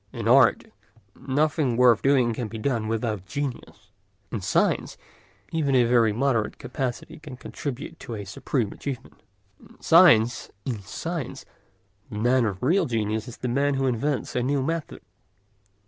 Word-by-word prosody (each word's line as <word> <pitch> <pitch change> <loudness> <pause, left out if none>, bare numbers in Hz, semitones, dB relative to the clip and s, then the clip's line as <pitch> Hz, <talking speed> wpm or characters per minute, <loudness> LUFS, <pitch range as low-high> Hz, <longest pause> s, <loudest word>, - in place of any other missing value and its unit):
In - - -4
art - - +5 0.5
nothing 145 -2 0
worth 125 -3 +5
doing 130 -4 +3
can 115 0 -4
be 115 - -7
done 115 -1 -1
without 110 -4 -2
genius; 125 -7 -6 0.4
in 115 - -3
science - - 0 0.5
even 145 -4 +1
a 125 - +5
very 120 -2 +3
moderate 115 -1 0
capacity 130 +3 -5
can 150 -5 -10
contribute 140 +4 -6
to 115 - -7
a 100 -1 -6
supreme 105 +3 -2
achievement. 135 -4 -7 0.4
In - - -19
science 125 -10 +5 0.2
the 130 - -5 0.6
man 120 +4 +2
of 100 -2 -4
real 175 +9 +3
genius 110 -2 -2
is 120 - -9
the 125 - -4
man 140 +3 +1
who 135 0 0
invents 130 +3 -1
a 125 - +1
new 135 +2 0
method. 165 +1 -4
125 Hz, 145 wpm, -25 LUFS, 115-140 Hz, 0.6 s, art